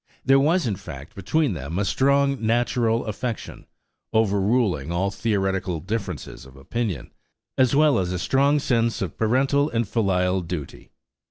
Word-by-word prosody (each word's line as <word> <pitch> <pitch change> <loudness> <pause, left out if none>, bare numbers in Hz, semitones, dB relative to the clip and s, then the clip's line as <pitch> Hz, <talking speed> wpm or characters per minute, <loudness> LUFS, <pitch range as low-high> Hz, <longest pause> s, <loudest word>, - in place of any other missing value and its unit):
There 135 +1 +5
was, 160 +4 +2
in 105 -5 -1
fact, 75 -7 -10
between 130 - 0
them 80 +1 -5
a 100 - 0
strong 140 +1 +2
natural 115 0 +1
affection, 115 +2 -5 0.4
overruling 100 - +1
all 95 +3 0
theoretical 95 -5 -1
differences 100 - -5
of 65 +1 -15
opinion, 100 - -4 0.4
as 130 0 +3
well 150 -5 +4
as 90 -1 -1
a 90 - -2
strong 140 +9 +2
sense 115 -6 0
of 90 - -5
parental 135 +6 +2
and 115 -4 -1
filial 95 -4 +1
duty. 85 -5 -7
110 Hz, 145 wpm, -24 LUFS, 90-130 Hz, 0.4 s, There